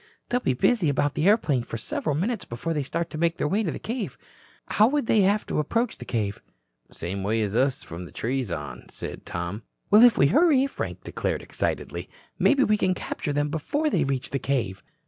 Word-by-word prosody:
"They'll 245 Hz, -, +2 dB
be 130 Hz, -, 0 dB
busy 180 Hz, -, +3 dB
about 145 Hz, +1 st, +1 dB
the 160 Hz, -, +1 dB
airplane 165 Hz, -, +3 dB
for 115 Hz, -, -6 dB
several 140 Hz, +6 st, -2 dB
minutes 195 Hz, +5 st, -1 dB
before 125 Hz, +8 st, -4 dB
they 150 Hz, -, 0 dB
start 165 Hz, +5 st, -3 dB
to 155 Hz, -, -5 dB
make 170 Hz, 0 st, +1 dB
their -, -, 0 dB
way 200 Hz, +8 st, +1 dB
to 200 Hz, -, -1 dB
the -, -, -3 dB
cave. 240 Hz, +2 st, -4 dB, 0.5 s
How 215 Hz, -, +4 dB
would 285 Hz, 0 st, 0 dB
they 220 Hz, -2 st, +4 dB
have 200 Hz, +2 st, +2 dB
to -, -, -1 dB
approach 230 Hz, -, 0 dB
the -, -, -8 dB
cave?" 105 Hz, -4 st, -2 dB, 0.5 s
"Same 95 Hz, +3 st, -4 dB
way 110 Hz, +3 st, +1 dB
as 105 Hz, 0 st, -2 dB
us 130 Hz, +2 st, +1 dB
from 85 Hz, +2 st, -7 dB
the -, -, -12 dB
trees 125 Hz, -1 st, -2 dB
on," 75 Hz, -6 st, -6 dB
said -, -, -8 dB
Tom. 85 Hz, +5 st, -4 dB, 0.3 s
"Well, 210 Hz, +2 st, +8 dB
if 240 Hz, -1 st, +7 dB
we -, -, +5 dB
hurry," 280 Hz, -, +5 dB
Frank 275 Hz, -, -5 dB
declared -, -, -2 dB
excitedly, -, -, -3 dB, 0.3 s
"maybe 280 Hz, -1 st, +4 dB
we 215 Hz, -3 st, +3 dB
can 185 Hz, -3 st, +1 dB
capture 150 Hz, -, -4 dB
them 145 Hz, +1 st, 0 dB
before 290 Hz, -, -1 dB
they -, -, +2 dB
reach 135 Hz, -2 st, -2 dB
the 140 Hz, -, -1 dB
cave." 115 Hz, -10 st, -1 dB
150 Hz, 215 wpm, -26 LUFS, -, 0.5 s, Well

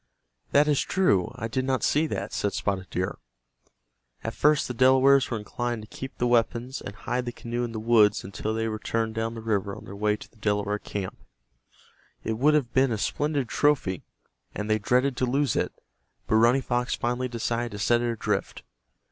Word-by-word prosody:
"That 145 Hz, +1 st, +5 dB
is 145 Hz, -2 st, +3 dB
true, 140 Hz, -, +2 dB
I 115 Hz, -, -4 dB
did 130 Hz, +3 st, -1 dB
not 130 Hz, -1 st, 0 dB
see 155 Hz, +2 st, +2 dB
that," -, -, -4 dB
said 100 Hz, -, -1 dB
Spotted 95 Hz, -2 st, -2 dB
Deer. 90 Hz, +1 st, -3 dB, 1.0 s
At -, -, -3 dB
first 150 Hz, 0 st, +3 dB
the 125 Hz, -, -4 dB
Delawares 130 Hz, +2 st, +5 dB
were 115 Hz, -, -1 dB
inclined 120 Hz, +2 st, -3 dB
to -, -, -11 dB
keep 135 Hz, +1 st, -7 dB
the 125 Hz, -, 0 dB
weapons, 120 Hz, +2 st, +1 dB
and 100 Hz, -, -7 dB
hide 125 Hz, +3 st, -2 dB
the 120 Hz, -, -3 dB
canoe 120 Hz, 0 st, -4 dB
in 120 Hz, -, -3 dB
the 110 Hz, -, -4 dB
woods 110 Hz, -2 st, +4 dB
until 100 Hz, +3 st, -4 dB
they 115 Hz, 0 st, -1 dB
returned 110 Hz, +1 st, -2 dB
down 115 Hz, +1 st, -2 dB
the 115 Hz, -, -6 dB
river 100 Hz, -3 st, -1 dB
on -, -, -11 dB
their 100 Hz, -, -9 dB
way 105 Hz, +1 st, +1 dB
to -, -, -12 dB
the -, -, -27 dB
Delaware 105 Hz, -1 st, 0 dB
camp. 100 Hz, -3 st, -5 dB, 1.0 s
It 110 Hz, 0 st, -2 dB
would 150 Hz, +3 st, +4 dB
have 130 Hz, -6 st, 0 dB
been 130 Hz, -1 st, +3 dB
a 110 Hz, -, 0 dB
splendid 145 Hz, +4 st, -1 dB
trophy, 125 Hz, -, +1 dB, 0.5 s
and 105 Hz, +1 st, -3 dB
they 110 Hz, 0 st, +2 dB
dreaded 125 Hz, +5 st, +2 dB
to 130 Hz, -, +1 dB
lose 140 Hz, +2 st, +1 dB
it, -, -, 0 dB, 0.5 s
but 110 Hz, -, +2 dB
Running 120 Hz, +4 st, +4 dB
Fox 125 Hz, 0 st, 0 dB
finally 125 Hz, +1 st, -1 dB
decided 120 Hz, -1 st, -2 dB
to -, -, -5 dB
set 120 Hz, +3 st, +2 dB
it 120 Hz, -, 0 dB
adrift. 115 Hz, -, -2 dB
120 Hz, 200 wpm, -26 LUFS, 105-130 Hz, 1.0 s, That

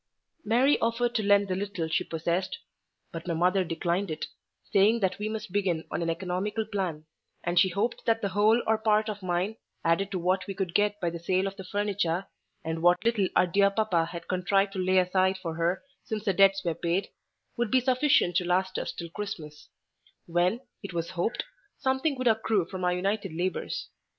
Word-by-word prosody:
Mary 250 Hz, +6 st, +3 dB
offered 235 Hz, +1 st, 0 dB
to 220 Hz, -, +1 dB
lend 200 Hz, -1 st, +4 dB
the 185 Hz, -, -1 dB
little 195 Hz, -3 st, -3 dB
she 160 Hz, -, 0 dB
possessed; 170 Hz, +3 st, -2 dB, 0.5 s
but 165 Hz, +1 st, -7 dB
my 170 Hz, -, 0 dB
mother 180 Hz, +3 st, +3 dB
declined 175 Hz, +3 st, -1 dB
it, 155 Hz, -, -3 dB, 0.5 s
saying 210 Hz, +3 st, +5 dB
that 190 Hz, -2 st, 0 dB
we 210 Hz, +1 st, -2 dB
must 215 Hz, -4 st, -5 dB
begin 180 Hz, -5 st, 0 dB
on -, -, -2 dB
an 165 Hz, -, -1 dB
economical 185 Hz, +6 st, -2 dB
plan; 185 Hz, -7 st, -3 dB, 0.4 s
and 175 Hz, 0 st, +2 dB
she 190 Hz, -, +5 dB
hoped 205 Hz, +7 st, -1 dB
that 225 Hz, 0 st, +3 dB
the 200 Hz, -, -1 dB
whole 215 Hz, +4 st, +3 dB
or 220 Hz, 0 st, +2 dB
part 215 Hz, 0 st, +2 dB
of 205 Hz, -1 st, -5 dB
mine, 185 Hz, +4 st, -1 dB, 0.3 s
added 170 Hz, +4 st, +2 dB
to 195 Hz, -, -2 dB
what 185 Hz, +1 st, 0 dB
we 195 Hz, -, -4 dB
could 190 Hz, -3 st, -3 dB
get 205 Hz, +1 st, +2 dB
by 175 Hz, -3 st, -1 dB
the 170 Hz, -, -6 dB
sale 185 Hz, +3 st, +1 dB
of 195 Hz, 0 st, -3 dB
the 190 Hz, -, -8 dB
furniture, 195 Hz, -2 st, -1 dB, 0.4 s
and 160 Hz, 0 st, -3 dB
what 175 Hz, +5 st, +4 dB
little 225 Hz, -5 st, +2 dB
our -, -, +5 dB
dear 200 Hz, +3 st, +3 dB
papa 200 Hz, -5 st, +1 dB
had 170 Hz, 0 st, -8 dB
contrived 195 Hz, +2 st, +1 dB
to 190 Hz, -, -4 dB
lay 185 Hz, +1 st, +2 dB
aside 185 Hz, +1 st, +3 dB
for 170 Hz, -3 st, -5 dB
her 170 Hz, +3 st, 0 dB, 0.2 s
since 215 Hz, -1 st, -4 dB
the 195 Hz, -, +2 dB
debts 195 Hz, +1 st, +4 dB
were 170 Hz, -, +1 dB
paid, 170 Hz, +4 st, -1 dB, 0.5 s
would 240 Hz, -2 st, -1 dB
be 260 Hz, -, +4 dB
sufficient 255 Hz, -, +3 dB
to 180 Hz, -, +3 dB
last 185 Hz, +2 st, 0 dB
us -, -, -3 dB
till 170 Hz, -, -7 dB
Christmas; 165 Hz, -7 st, -7 dB, 0.6 s
when, 175 Hz, +7 st, +1 dB, 0.2 s
it 200 Hz, -3 st, -7 dB
was 170 Hz, 0 st, -3 dB
hoped, 185 Hz, +5 st, -1 dB, 0.3 s
something 265 Hz, +2 st, 0 dB
would 255 Hz, -1 st, 0 dB
accrue 220 Hz, -4 st, +2 dB
from 185 Hz, +1 st, -6 dB
our 180 Hz, 0 st, +2 dB
united 195 Hz, +1 st, -1 dB
labours. 180 Hz, +1 st, -3 dB
190 Hz, 200 wpm, -28 LUFS, 175-210 Hz, 0.6 s, saying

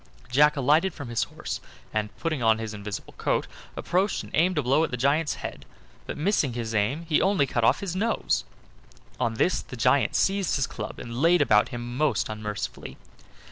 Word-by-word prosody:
Jack 150 Hz, +3 st, +5 dB
alighted 155 Hz, +7 st, +3 dB
from 140 Hz, -6 st, -7 dB
his 115 Hz, -1 st, 0 dB
horse, -, -, -6 dB, 0.3 s
and, 105 Hz, -1 st, -1 dB
putting 155 Hz, -5 st, -2 dB
on 110 Hz, -1 st, +4 dB
his 110 Hz, -1 st, -5 dB
invisible 105 Hz, 0 st, -6 dB
coat, -, -, +1 dB, 0.3 s
approached 190 Hz, +3 st, 0 dB
and -, -, -12 dB
aimed 180 Hz, +3 st, +2 dB
a -, -, +2 dB
blow 135 Hz, +6 st, +3 dB
at -, -, 0 dB
the 125 Hz, -, -3 dB
giant's 145 Hz, +5 st, +1 dB
head, -, -, -7 dB, 0.4 s
but, -, -, -5 dB
missing 150 Hz, -, +1 dB
his 115 Hz, -2 st, -4 dB
aim, 120 Hz, +11 st, 0 dB
he 155 Hz, -2 st, +3 dB
only 190 Hz, -7 st, +3 dB
cut 120 Hz, -3 st, -1 dB
off 125 Hz, +5 st, +4 dB
his 190 Hz, -3 st, -3 dB
nose. 225 Hz, +4 st, 0 dB, 0.8 s
On 115 Hz, -1 st, 0 dB
this 180 Hz, -, +1 dB
the 125 Hz, -, -10 dB
giant 125 Hz, +4 st, +3 dB
seized 195 Hz, -1 st, +2 dB
his 135 Hz, -, +1 dB
club 105 Hz, -5 st, -7 dB
and 120 Hz, +2 st, -5 dB
laid 175 Hz, +2 st, +5 dB
about 105 Hz, -8 st, +4 dB
him 120 Hz, -1 st, -6 dB
most 140 Hz, -9 st, +1 dB
unmercifully. 105 Hz, -1 st, -5 dB
135 Hz, 190 wpm, -26 LUFS, 115-165 Hz, 0.8 s, Jack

